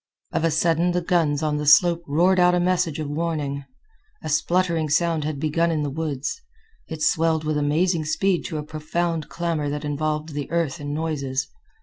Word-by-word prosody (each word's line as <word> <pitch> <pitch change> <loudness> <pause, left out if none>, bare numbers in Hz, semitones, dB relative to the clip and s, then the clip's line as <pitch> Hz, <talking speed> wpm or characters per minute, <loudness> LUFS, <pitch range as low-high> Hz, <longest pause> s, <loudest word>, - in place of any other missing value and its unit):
Of - - 0
a 165 - +3
sudden 165 +2 +2
the 180 - +1
guns 165 -5 +1
on 150 -1 0
the 150 0 -3
slope 170 +3 +6
roared 175 +6 +3
out 180 0 +5
a - - +2
message 175 -4 +1
of 155 -2 -3
warning. 145 -3 -2 0.6
A - - -4
spluttering 165 +1 +1
sound 165 0 +1
had 150 -2 -3
begun 160 +3 +1
in 155 -2 0
the 145 - -2
woods. 150 - -3 0.5
It 160 -1 -5
swelled 160 -1 +2
with 155 0 -1
amazing 155 +3 +1
speed 180 +4 +1
to 155 - -4
a 150 - -3
profound 160 +1 -3
clamor 165 -4 -2
that 150 +1 -4
involved 150 +1 -2
the 145 -2 -5
earth 165 -4 -1
in 145 0 -4
noises. 145 -4 -2
155 Hz, 190 wpm, -23 LUFS, 150-170 Hz, 0.6 s, slope